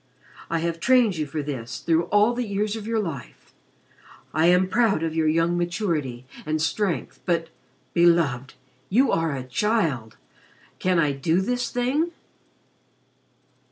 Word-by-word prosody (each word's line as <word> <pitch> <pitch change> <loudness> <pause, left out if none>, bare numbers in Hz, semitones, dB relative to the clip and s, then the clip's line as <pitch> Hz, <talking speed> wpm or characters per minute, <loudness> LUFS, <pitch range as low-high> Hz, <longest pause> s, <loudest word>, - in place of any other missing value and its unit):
I 165 - 0
have 165 0 -2
trained 235 -2 +3
you 155 -1 -2
for 150 +1 -4
this 130 -5 -5
through 165 0 +1
all 210 +5 +3
the 245 +1 -2
years 205 +1 -1
of 220 -1 -7
your 225 -1 0
life. 160 - -7 0.8
I 155 +2 +3
am 180 +1 +4
proud 200 -5 +2
of 165 -1 -1
your 160 -1 +1
young 165 +2 +2
maturity 165 - -2 0.2
and 155 +1 -1
strength 180 +3 -1
but 170 -2 0 0.4
Beloved 165 -7 +2 0.3
you 255 +8 +3
are 165 -3 0
a 130 - -4
child! 135 - -1 0.6
Can 185 -1 +1
I 150 -3 +3
do 160 +6 +1
this 245 +5 -1
thing!" 260 +7 0
170 Hz, 145 wpm, -24 LUFS, 155-210 Hz, 0.8 s, am